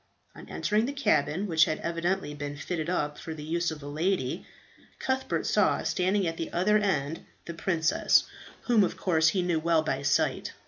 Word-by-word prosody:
On - - -13
entering 215 +3 0
the 280 - -3
cabin, 195 - +1
which 160 -4 +4
had 155 - -2
evidently 170 -1 -2
been 145 0 -6
fitted 160 +2 -3
up 150 -5 -1
for 160 - -6
the 150 - -8
use 170 +2 -1
of 155 -2 -7
a - - -7
lady, 160 0 -1 0.5
Cuthbert 260 0 -1
saw - - +2
standing 190 +2 +1
at 165 -1 -2
the 165 - -4
other 210 +5 +3
end 160 -6 -1 0.2
the 170 - -6
princess 165 -1 +2 0.4
whom 230 -4 +3
of - - -2
course 160 -4 +2
he 180 +2 +2
knew 175 -2 +1
well 165 0 +2
by 135 -3 -2
sight. 140 -1 0
165 Hz, 185 wpm, -28 LUFS, 155-190 Hz, 0.5 s, which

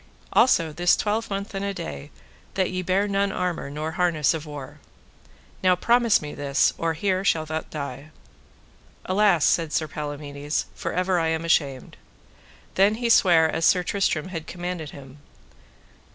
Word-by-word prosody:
Also 165 -11 +4
this 175 +3 +3
twelvemonth 205 -2 -2
and 195 0 -3
a 200 0 -3
day 70 - -7 0.5
that 190 -2 0
ye 185 0 -2
bear 190 +3 +1
none 200 0 0
armour 180 -6 -3
nor 150 +2 -4
none - - -11
harness 170 -5 +2
of 160 -1 -6
war. 145 0 -9 0.8
Now 185 -1 +4
promise 235 0 +3
me 150 - -6
this, 140 0 +1
or 165 0 0
here 185 +2 0
shalt 160 -5 +1
thou 160 0 -2
die. 140 -1 -6 1.0
Alas, 190 -4 +3
said 165 -2 +2
Palamides, 145 -1 -3
for - - -4
ever 180 0 +1
am 160 0 0
I - - -5
ashamed. 140 -6 0 0.8
Then 200 +3 +3
he 235 +1 -2
sware 170 -7 +5
as 160 +1 -2
Sir 180 +1 +4
Tristram 185 -3 -1
had 165 -4 -6
commanded 175 -3 -5
him. 135 0 -12
165 Hz, 155 wpm, -24 LUFS, 150-190 Hz, 1.0 s, sware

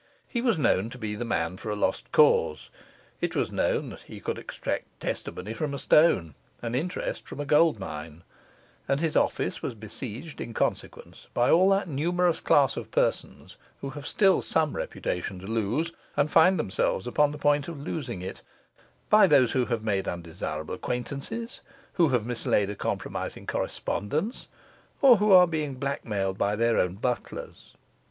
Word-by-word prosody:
He 235 - -2
was 235 -7 +2
known 115 -7 +2
to 125 - -10
be 110 -3 -4
the 105 +3 -4
man 85 -6 -1
for 110 - -6
a 105 - -1
lost 105 - -1
cause; 75 - +3 0.5
it - - -2
was - - 0
known - - -1
he - - -10
could - - -3
extract - - -5
testimony 105 +5 -4
from 145 +3 -3
a - - -4
stone, 125 - +4 0.3
and 115 0 -3
interest 175 +8 -3
from - - -8
a 145 - -2
gold 150 -1 +4
mine; 80 -3 -7 0.6
and 135 - +1
his 160 -1 -1
office - - +1
was - - -4
besieged 120 +7 -7
in 115 - -6
consequence - - -3
by 120 - +3
all 185 +3 +6
that 195 -1 +2
numerous 170 +3 +1
class 140 -2 +3
of - - -5
persons - - -1 0.2
who 135 - -4
have 145 +2 -7
still 195 -3 +3
some 160 -2 0
reputation 90 +2 -3
to 90 - -10
lose, 115 +10 -1 0.3
and 145 +1 +2
find 180 +4 +6
themselves 95 -5 0
upon 145 +4 +2
the 150 - -7
point 145 -1 +2
of 165 -4 -6
losing 125 - -4
it; 95 - -7 0.7
by 210 -2 +7
those 135 -7 +5
who 130 -2 +1
have 115 -3 -2
made 100 -3 0
undesirable 80 -2 -5
acquaintances, 140 - -4 0.3
who 170 -4 +3
have 125 -5 +1
mislaid 110 -4 0
a - - -6
compromising - - -4
correspondence, 155 - -2 0.5
or 260 -5 +7
who 210 +1 +2
are 180 -1 +9
blackmailed 140 - -2
by 100 +1 +1
their 115 +1 +2
own 90 0 +1
butlers. 120 +4 -5
130 Hz, 165 wpm, -27 LUFS, 105-160 Hz, 0.7 s, are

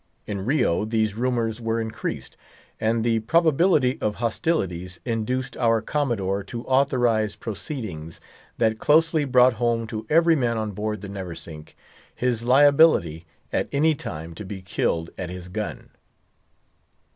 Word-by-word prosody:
In 100 -2 -4
Rio 125 - +2
these 110 -1 0
rumours 120 -1 -1
were 115 0 -1
increased; 110 -1 -5 0.4
and 115 +1 +1
the 115 -1 +2
probability 155 - +2
of 105 -1 0
hostilities 95 - -2
induced 125 +2 -2
our 115 -2 +3
Commodore 110 -7 -1
to 115 +4 -6
authorize 120 -5 +2
proceedings 100 - -6 0.4
that 110 0 +1
closely 160 0 +3
brought 125 -1 +5
home 115 -1 +1
to 110 0 -6
every 165 +1 +5
man 120 -5 0
on 110 -1 -2
board 105 +1 -3
the 100 - -7
Neversink 85 -5 -8 0.4
his 120 -2 0
liability 130 - +4 0.3
at - - 0
any 155 +3 +3
time 80 - -7
to 95 - -8
be 95 -1 -7
killed 85 -2 -1
at 90 -2 -4
his 90 0 -8
gun. 105 +3 -5
115 Hz, 135 wpm, -24 LUFS, 100-130 Hz, 0.4 s, brought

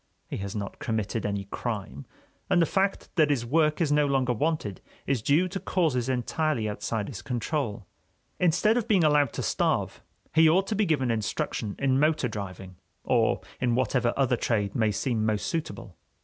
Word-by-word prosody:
He - - -5
has 100 0 -5
not 100 -1 -5
committed 110 -1 -2
any 100 -1 -2
crime, 95 - -4 0.4
and 175 - +4
the 165 - +5
fact 195 +3 0
that 155 -2 +5
his 130 -5 0
work 150 +4 +2
is 160 -4 +1
no 150 0 +3
longer 130 -3 +1
wanted 135 - -2 0.2
is 130 -4 0
due 150 +10 +3
to 195 - -4
causes 140 -12 0
entirely 130 -1 0
outside 105 0 -3
his 100 -9 -7
control. 120 - -3 0.5
Instead 180 +6 +3
of 235 -2 -1
being 195 -6 +4
allowed 145 -4 +4
to - - -3
starve, - - 0 0.3
he 160 0 +6
ought 190 +4 +3
to 215 - -2
be 205 -1 +1
given 135 -6 +1
instruction 110 -1 -2
in 135 -1 +2
motor 155 -3 +2
driving 95 -4 -7 0.3
or - - +2 0.2
in 120 -2 +1
whatever 125 -1 +1
other 130 -3 +2
trade 105 -4 0
may 110 -2 +2
seem 110 +2 -1
most 110 -1 0
suitable. 100 - -4
125 Hz, 175 wpm, -27 LUFS, 110-155 Hz, 0.5 s, he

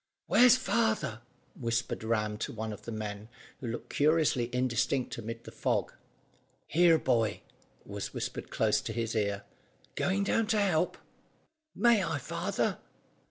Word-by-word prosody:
"Where's 250 0 +7
father?" 220 - 0 0.3
whispered 115 -2 -2
Ram 105 -2 0
to - - -3
one 110 -1 -4
of 105 - -11
the 115 - -5
men, 105 0 -5 0.3
who 125 - -5
looked 115 +1 -5
curiously 150 -5 +3
indistinct 125 +1 0
amid 115 +1 -6
the - - -10
fog. - - -1 0.7
"Here, 170 0 +5
boy," 115 -7 +1 0.4
was - - -5
whispered - - -5
close - - +2
to - - -5
his 115 -1 -2
ear. 100 -2 0 0.5
"Going 190 +1 0
down 220 +2 +1
to 220 -1 +2
help?" 180 -4 +1 0.8
"May 235 -4 +4
I, 165 -4 -1
father?" 130 - -2
120 Hz, 140 wpm, -30 LUFS, 110-175 Hz, 0.8 s, Where's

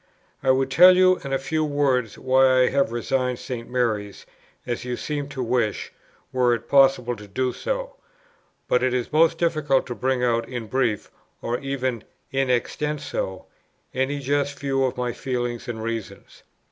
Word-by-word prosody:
I 135 - 0
would 130 0 +2
tell 180 +5 +8
you 185 0 +5
in 140 - -5
a 135 - +2
few 155 +4 -1
words 135 -6 0
why 130 0 +4
I - - +3
have 140 -5 +1
resigned 125 +1 -1
St. 120 -3 -6
Mary's, 110 -5 -2 0.4
as 120 0 -3
you 125 -1 -3
seem 145 -2 -4
to 135 -2 -4
wish, 115 -3 -1 0.4
were 125 -2 +3
it 115 - -9
possible 135 -3 +4
to 105 -1 -12
do 125 +5 -1
so. - - -4 0.7
But 125 - +2
it 130 0 +1
is 125 +2 -3
most 165 +1 +4
difficult 155 -5 +1
to 125 - -5
bring 125 +2 -1
out 115 -1 +1
in 120 -3 -5
brief, 115 -3 -1 0.3
or 120 +1 -2
even 130 -4 -3 0.3
in 135 -1 0
extenso, 125 -6 -2 0.5
any 130 +2 0
just 140 +1 -1
view 135 -1 0
of 130 - -2
my 125 -1 -2
feelings 120 -1 -3
and 110 -2 -5
reasons. 115 -2 -6
130 Hz, 170 wpm, -24 LUFS, 120-140 Hz, 0.7 s, tell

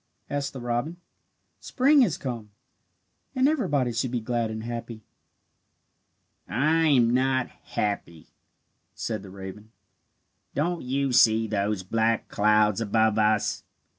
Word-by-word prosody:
asked 145 -1 -2
the 135 - -8
robin. 120 +7 -2 0.6
"Spring 280 +3 +3
has 210 - +2
come, 120 -5 -5 0.9
and 260 +1 +3
everybody 145 - +1
should 120 +3 -1
be 120 0 -2
glad 115 0 -2
and 110 0 -5
happy." 115 -1 -6 1.5
"I 160 +5 +2
am 125 -6 +4
not 130 0 +1
happy," 85 -6 -4 0.7
said 110 -2 -3
the 100 - -11
raven. 95 +3 -9 0.9
"Don't 170 +3 -1
you 135 +1 -1
see 115 -2 +5
those 100 -2 -1
black 115 +3 0
clouds 105 0 +3
above 110 0 +2
us? 110 -1 +1
120 Hz, 120 wpm, -26 LUFS, 110-140 Hz, 1.5 s, see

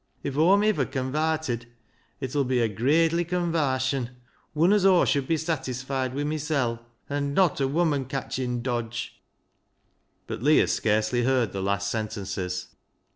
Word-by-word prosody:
If 140 - -3
Aw'm 185 +7 +4
iver 210 -11 +2
con 130 0 -3
varted 155 -6 -1 0.5
it 130 0 -5
ull 145 - +3
be 130 -1 0
a 115 - +3
gradely 160 - +2
convarsion, 145 -8 0 0.5
wun 170 +6 +4
as 210 -3 +3
Aw 190 -2 +5
should 140 -3 +1
be 165 - +2
satisfied 135 -4 -2
wi' 145 - -1
mysel', 145 -6 -1 0.3
an' 140 0 -2
not 180 -7 +3
a 135 - +2
woman 145 -2 +1
catching 125 -2 -3
dodge." 120 -1 -4 1.0
But - - -6
Leah 150 +4 +4
scarcely 110 +2 +1
heard 125 -5 +2
the 95 - -4
last 100 +1 -1
sentences. 95 -4 -4
135 Hz, 145 wpm, -26 LUFS, 120-155 Hz, 1.0 s, Aw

